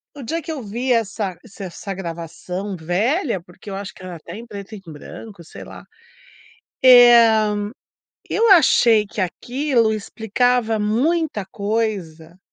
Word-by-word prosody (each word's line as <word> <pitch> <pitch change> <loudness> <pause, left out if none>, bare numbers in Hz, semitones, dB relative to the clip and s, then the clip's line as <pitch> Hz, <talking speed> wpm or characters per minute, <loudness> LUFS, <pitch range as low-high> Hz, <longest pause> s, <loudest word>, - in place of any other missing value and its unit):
o 280 - -9
dia 325 +8 -3
que 320 - -7
eu 300 -4 -5
vi 240 +5 -3
essa 205 -5 -1
se 200 -2 -11
essa 190 +2 -6
gravação. 180 +2 -6
Velha 200 - -1
porque, 175 +4 -14
eu 195 - -5
acho 195 0 -7
que 185 - -15
ela 180 -2 -8
tá 170 +4 -10
em 230 +2 -9
preto 205 -1 -9
em 200 - -11
branco, 170 +5 -11
sei 160 - -11
lá, - - -12 1.0
eh, 235 -4 +7 0.7
eu 455 -2 +3
achei 235 - +5
que 200 0 -5
aquilo 240 - 0
explicava 225 +2 0
muita 250 - 0
coisa. 190 -6 -4
215 Hz, 145 wpm, -20 LUFS, 190-245 Hz, 1.0 s, eh